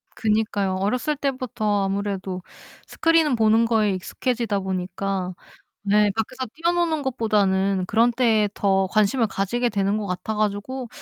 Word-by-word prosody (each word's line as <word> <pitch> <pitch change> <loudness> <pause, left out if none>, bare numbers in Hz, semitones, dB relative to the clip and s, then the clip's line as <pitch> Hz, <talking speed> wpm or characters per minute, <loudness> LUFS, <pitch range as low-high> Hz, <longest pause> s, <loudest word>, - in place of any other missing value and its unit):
그니까요. 210 -3 0
어렸을 245 +10 0
때부터 250 -7 -1
아무래도 195 -2 -3 0.5
스크린 330 -4 +2
보는 225 0 +4
거에 220 -3 +2
익숙해지다 220 +3 -2
보니까 185 0 -3 0.5
네 205 0 +3
밖에서 255 +4 -3
뛰어노는 335 -2 0
것보다는 200 -6 +1
그런 230 +3 +3
데에 225 -4 +2
더 195 -1 +1
관심을 215 +4 +2
가지게 225 +5 -1
되는 200 -1 0
것 210 -1 -4
같아 180 +4 -3
가지고 215 +5 -2
210 Hz, 325 characters per minute, -23 LUFS, 195-240 Hz, 0.5 s, 보는